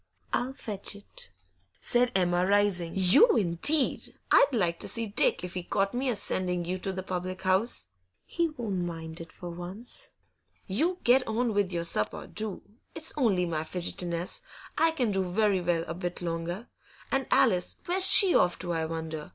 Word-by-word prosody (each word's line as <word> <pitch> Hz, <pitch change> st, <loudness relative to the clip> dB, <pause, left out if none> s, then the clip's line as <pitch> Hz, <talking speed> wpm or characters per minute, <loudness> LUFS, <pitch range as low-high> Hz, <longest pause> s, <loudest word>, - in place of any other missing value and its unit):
I'll 255 Hz, +2 st, -1 dB
fetch 205 Hz, -6 st, -6 dB
it,' 485 Hz, -, -7 dB, 0.5 s
said 245 Hz, 0 st, +1 dB
Emma, 175 Hz, -1 st, +2 dB
rising. 200 Hz, -4 st, +1 dB
'You 195 Hz, -, +5 dB
indeed! 220 Hz, -, +2 dB, 0.2 s
I'd -, -, +7 dB
like 175 Hz, -9 st, 0 dB
to -, -, -2 dB
see 230 Hz, -1 st, +3 dB
Dick 205 Hz, -3 st, +2 dB
if 180 Hz, 0 st, -6 dB
he 180 Hz, -, -3 dB
caught 195 Hz, +3 st, -1 dB
me 255 Hz, +2 st, -1 dB
a 240 Hz, -, 0 dB
sending 180 Hz, -3 st, -1 dB
you 185 Hz, +2 st, -3 dB
to 195 Hz, -, -2 dB
the 185 Hz, 0 st, -5 dB
public 185 Hz, 0 st, -5 dB
house.' 190 Hz, -, +1 dB, 0.4 s
'He 340 Hz, -1 st, -1 dB
won't 220 Hz, -, -3 dB
mind 165 Hz, -1 st, -6 dB
it 165 Hz, -, -10 dB
for 175 Hz, -1 st, -8 dB
once.' 190 Hz, -, -6 dB, 0.6 s
'You 320 Hz, -, 0 dB
get 255 Hz, +2 st, +4 dB
on 225 Hz, +1 st, 0 dB
with 200 Hz, -2 st, +1 dB
your 170 Hz, -1 st, -2 dB
supper, 105 Hz, -10 st, +1 dB
do. 215 Hz, -3 st, -3 dB, 0.3 s
It's 320 Hz, 0 st, +1 dB
only 205 Hz, -10 st, +2 dB
my 160 Hz, -2 st, -2 dB
fidgetiness; 175 Hz, -, -4 dB, 0.3 s
I 325 Hz, -, +3 dB
can 255 Hz, -9 st, -1 dB
do 195 Hz, -1 st, 0 dB
very 195 Hz, +1 st, +1 dB
well 170 Hz, -1 st, 0 dB
a 165 Hz, -, -4 dB
bit 175 Hz, 0 st, -5 dB
longer. 170 Hz, +5 st, -4 dB, 0.4 s
And 270 Hz, -2 st, 0 dB
Alice, 180 Hz, -1 st, +3 dB
where's 370 Hz, +2 st, +4 dB
she 385 Hz, -2 st, +7 dB
off 175 Hz, 0 st, +3 dB
to, 175 Hz, -1 st, -3 dB
I 160 Hz, -1 st, -1 dB
wonder? 160 Hz, -1 st, -5 dB
190 Hz, 175 wpm, -28 LUFS, 175-235 Hz, 0.6 s, I'd